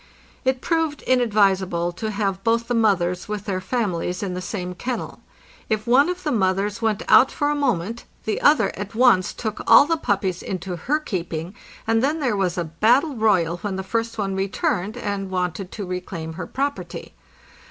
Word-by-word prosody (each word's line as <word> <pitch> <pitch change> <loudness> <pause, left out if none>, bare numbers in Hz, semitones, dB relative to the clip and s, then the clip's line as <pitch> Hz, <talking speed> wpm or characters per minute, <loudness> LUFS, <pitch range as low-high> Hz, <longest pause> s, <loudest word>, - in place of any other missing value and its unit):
It 260 0 0
proved 325 -3 -1
inadvisable 195 -8 +2
to 215 +5 -4
have 195 -2 -2
both 230 0 +1
the 245 - -1
mothers 190 -6 +1
with 210 -1 -4
their 185 -3 -2
families 185 -4 -2
in 190 -2 -3
the 180 - -4
same 180 -1 -4
kennel. 240 +7 -5 0.5
If 215 -1 0
one 260 +7 +4
of 360 0 -4
the 300 - 0
mothers 200 +1 0
went 220 -3 0
out 265 - +6
for 290 0 0
a - - 0
moment, 235 -6 -1 0.2
the 220 - -1
other 300 +1 +4
at 205 +2 -7
once 230 -7 +4
took 220 -2 -4
all - - +8
the 330 +2 0
puppies 195 - -1
into 185 -1 -4
her 265 - 0
keeping, 175 - -4 0.3
and 225 +1 +2
then 300 +4 +1
there 255 -7 0
was 190 -2 0
a 175 - 0
battle 235 - +2
royal 185 -7 +2
when 195 +1 -4
the 190 - -3
first 230 +3 -2
one 195 -2 -1
returned 195 +2 -1
and 200 -4 -3
wanted 180 0 -3
to 205 - -5
reclaim 180 -3 -5
her 180 - -6
property. 280 +1 -4
205 Hz, 185 wpm, -23 LUFS, 185-240 Hz, 0.5 s, all